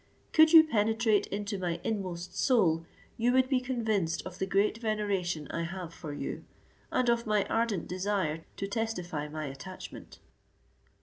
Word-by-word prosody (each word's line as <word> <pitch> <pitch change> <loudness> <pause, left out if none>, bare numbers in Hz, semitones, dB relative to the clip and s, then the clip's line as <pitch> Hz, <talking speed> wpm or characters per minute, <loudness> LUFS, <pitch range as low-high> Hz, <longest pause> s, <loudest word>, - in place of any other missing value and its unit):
Could 315 0 +7
you 325 -2 +10
penetrate 225 -5 +2
into 205 0 -3
my 175 -2 -2
inmost 185 -4 -3
soul, 170 -10 +2 0.3
you 235 +2 +2
would 260 0 +4
be 260 -1 +2
convinced 220 -9 -1
of 185 0 -8
the 190 - -1
great 200 +3 +2
veneration 200 - -1
I 170 - -2
have 170 0 -5
for 155 - -7
you, 145 - -5 0.5
and 255 -1 +1
of 235 -1 +2
my 210 -2 +2
ardent 225 -6 0
desire 180 -4 -1
to 195 - -3
testify 180 -8 -3
my 155 +1 -5
attachment." 145 +7 -9
200 Hz, 150 wpm, -30 LUFS, 175-225 Hz, 0.5 s, you